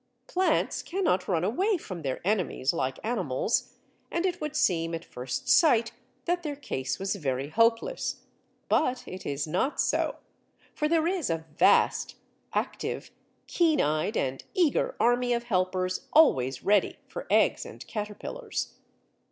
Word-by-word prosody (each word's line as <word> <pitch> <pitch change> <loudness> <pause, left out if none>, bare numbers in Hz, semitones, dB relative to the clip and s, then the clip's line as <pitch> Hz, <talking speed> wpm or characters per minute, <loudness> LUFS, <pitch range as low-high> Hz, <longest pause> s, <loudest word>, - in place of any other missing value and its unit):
Plants 370 +1 +1
cannot 340 - 0
run 170 -4 +1
away 370 - +1
from 185 - -7
their 135 -3 -3
enemies 180 -9 +1
like 135 -6 -1
animals, 210 - 0 0.4
and 340 +2 -1
it 360 -1 -1
would 300 -1 -3
seem 165 - +1
at 165 - -7
first 125 +1 -5
sight 235 -8 +5 0.3
that 350 0 0
their 300 -4 -4
case 130 - -3
was 195 0 -1
very 135 -5 -2
hopeless. 230 - +1 0.4
But 255 -4 +1
it 185 - -7
is 140 +1 -1
not 185 - -1
so, - - +1 0.6
for 300 - 0
there 325 0 +2
is 350 - 0
a 165 -1 -2
vast, - - +3 0.4
active, - - -3 0.3
keen 325 -4 +2
eyed, 155 +8 +1
and 130 0 -2
eager 370 - +2
army 245 +1 +3
of 235 0 -1
helpers 185 -4 -1
always 130 - +4
ready 205 0 +2
for - - -7
eggs - - +3
and - - -10
caterpillars. 220 - -5
215 Hz, 145 wpm, -28 LUFS, -, 0.6 s, sight